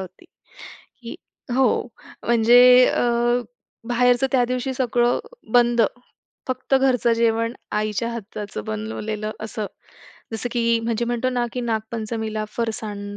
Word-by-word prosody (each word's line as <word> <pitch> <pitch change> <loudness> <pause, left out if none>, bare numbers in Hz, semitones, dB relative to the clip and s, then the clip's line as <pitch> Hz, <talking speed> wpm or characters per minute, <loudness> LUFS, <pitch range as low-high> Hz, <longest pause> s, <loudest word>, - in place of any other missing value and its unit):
होती, 185 - -10 0.8
की 230 - -7 0.4
हो, 255 -1 +2 0.4
म्हणजे 235 +1 +6 0.3
अ, 240 0 +1 0.5
बाहेरचं 245 +2 +3
त्यादिवशी 255 +1 +1
सगळं 245 -1 +1 0.3
बंद. 240 -1 +4 0.7
फक्त 255 +1 -1
घरचं 255 -3 +3
जेवण, 230 0 +1 0.2
आईच्या 215 +2 -1
हाताचं 205 - -6
बनवलेलं 110 - -4
असं. 220 -1 -4 0.7
जसं 225 +2 -3
की 230 -1 +2
म्हणजे 230 0 -1
म्हणतो 240 +1 -1
ना, 245 -1 0
की 250 - -3
नागपंचमीला 220 -1 -3
फरसाण 210 -3 -4
235 Hz, 110 wpm, -22 LUFS, 215-245 Hz, 0.8 s, म्हणजे